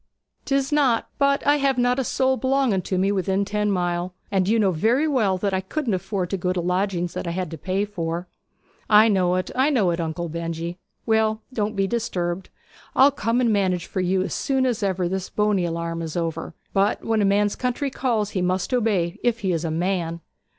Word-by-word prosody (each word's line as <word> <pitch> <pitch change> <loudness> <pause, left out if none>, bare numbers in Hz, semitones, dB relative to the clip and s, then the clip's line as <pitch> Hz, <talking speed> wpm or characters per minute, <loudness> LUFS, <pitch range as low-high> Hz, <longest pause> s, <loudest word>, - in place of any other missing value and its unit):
''Tis 275 +1 +1
not. 265 -6 +2
But 280 0 +2
I 290 +1 +4
have 275 -2 +1
not 245 +1 +2
a - - +1
soul 260 +1 +1
belonging 260 -7 +1
to 185 - 0
me 195 +2 +2
within 195 0 0
ten 210 +1 -1
mile; 180 -1 -1 0.2
and 190 -2 +1
you 230 - +3
know 200 -4 +3
very 230 - +2
well 220 -10 +2
that 195 +1 -1
I 190 - +1
couldn't 240 +4 -2
afford 185 -1 -2
to 195 - 0
go 180 0 -1
to 185 - -1
lodgings 180 -1 -1
that - - -4
I - - -1
had 185 -4 -3
to 165 - -6
pay 190 +5 -1
for.' 170 -3 -4 0.6
'I 215 +1 +7
know 180 -3 +2
it 185 -1 -2
I 265 +3 +3
know 220 -11 +2
it, 170 - -2
Uncle 165 +1 -3
Benjy! 170 +1 -4 0.3
Well, 220 0 +1
don't 215 -2 -1
be 195 -1 +1
disturbed. 190 -5 -2 0.5
I'll 275 +2 +6
come 245 -2 0
and 235 -3 +3
manage 185 -4 +1
for 190 - -3
you 185 +1 +1
as - - -4
soon 265 -1 0
as 245 -4 0
ever 190 -3 0
this 190 +1 -3
Boney 210 -4 +1
alarm 165 0 -3
is 165 0 -4
over; 165 -2 -3 0.2
but 200 +1 +1
when 225 -1 +1
a - - +3
man's 205 +1 +2
country 255 +2 -2
calls 225 -6 -1
he 185 - -1
must 180 +4 -1
obey, 210 -6 +1
if 235 -1 +1
he 190 -3 0
is 165 -1 -1
a 165 - -1
man.' 170 0 -1
195 Hz, 215 wpm, -23 LUFS, 180-230 Hz, 0.6 s, I